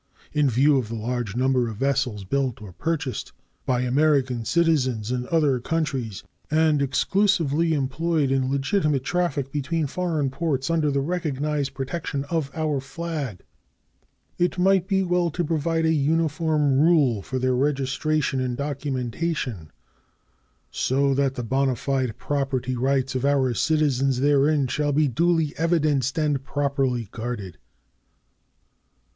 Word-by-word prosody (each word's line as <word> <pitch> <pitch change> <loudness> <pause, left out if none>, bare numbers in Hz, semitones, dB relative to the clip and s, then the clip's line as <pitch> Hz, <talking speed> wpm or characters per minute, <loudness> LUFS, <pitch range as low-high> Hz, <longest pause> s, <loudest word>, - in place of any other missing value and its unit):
In 150 -2 +3
view 135 +4 +4
of 120 - -4
the 115 - -4
large 115 -1 -3
number 130 -1 +2
of 110 - -5
vessels 130 -5 0
built 130 +4 -1
or 105 -4 -10
purchased 145 - -3 0.3
by 125 -1 +1
American 130 -2 +1
citizens 130 -9 +1
in 125 0 -2
other 150 -6 +2
countries 135 -7 -2 0.3
and 155 -1 +3
exclusively 165 +1 +2
employed 145 +1 0
in 130 -1 +1
legitimate 140 0 0
traffic 145 -5 -1
between 150 +3 -1
foreign 155 -3 -1
ports 140 -1 -1
under 160 -3 +2
the 140 -1 0
recognized 150 -3 -2
protection 140 +1 -3
of 160 -5 0
our 155 -3 0
flag, 140 - -5 1.0
it 175 +1 +1
might 190 0 +3
be 190 -1 +2
well 175 -1 +1
to 175 +2 -2
provide 165 +1 0
a 160 - +3
uniform 155 -1 +1
rule 145 - +3
for 130 - -4
their 130 0 +1
registration 140 +1 0
and 125 -1 -2
documentation, 135 - -3 1.0
so 135 +1 +1
that 135 -1 +1
the 125 - -4
bona 135 +2 +1
fide 130 -2 -2
property 135 -3 -2
rights 135 +1 0
of 130 0 -2
our 135 -3 +2
citizens 135 -2 +1
therein 145 +1 +3
shall 145 +3 -1
be 150 +1 +3
duly 160 +3 +1
evidenced 150 -5 +1
and 150 -4 0
properly 135 -4 -1
guarded. 110 -6 -6
140 Hz, 135 wpm, -24 LUFS, 130-155 Hz, 1.0 s, view